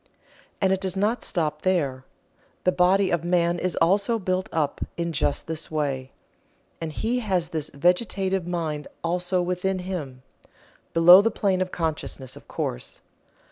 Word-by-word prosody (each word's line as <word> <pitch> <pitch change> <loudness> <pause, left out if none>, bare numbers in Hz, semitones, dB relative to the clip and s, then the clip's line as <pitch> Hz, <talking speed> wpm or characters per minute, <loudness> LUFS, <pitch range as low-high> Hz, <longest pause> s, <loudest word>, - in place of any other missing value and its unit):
And 190 -1 +3
it 190 - -1
does 190 -1 -2
not 215 +5 +1
stop 155 -3 -1
there. 140 -9 0 0.6
The 185 - +4
body 185 +2 +3
of 170 -1 0
man 175 0 +2
is 185 - -1
also 200 +7 +2
built 185 -2 -1
up 150 -3 -1 0.2
in 170 0 -1
just 145 -1 0
this 160 0 -3
way, 140 -4 -2 0.7
and 160 -1 -3
he 230 +10 -1
has 185 -7 0
this 155 -2 -3
vegetative 185 +3 +1
mind 160 -4 -3 0.2
also 180 +2 0
within 180 +2 -1
him, 160 -9 -5 0.7
below 175 +3 +9
the 225 - +2
plane 195 -3 0
of 185 - 0
consciousness, 155 -5 -4
of - - -14
course. - - -4
180 Hz, 150 wpm, -25 LUFS, 160-190 Hz, 0.7 s, below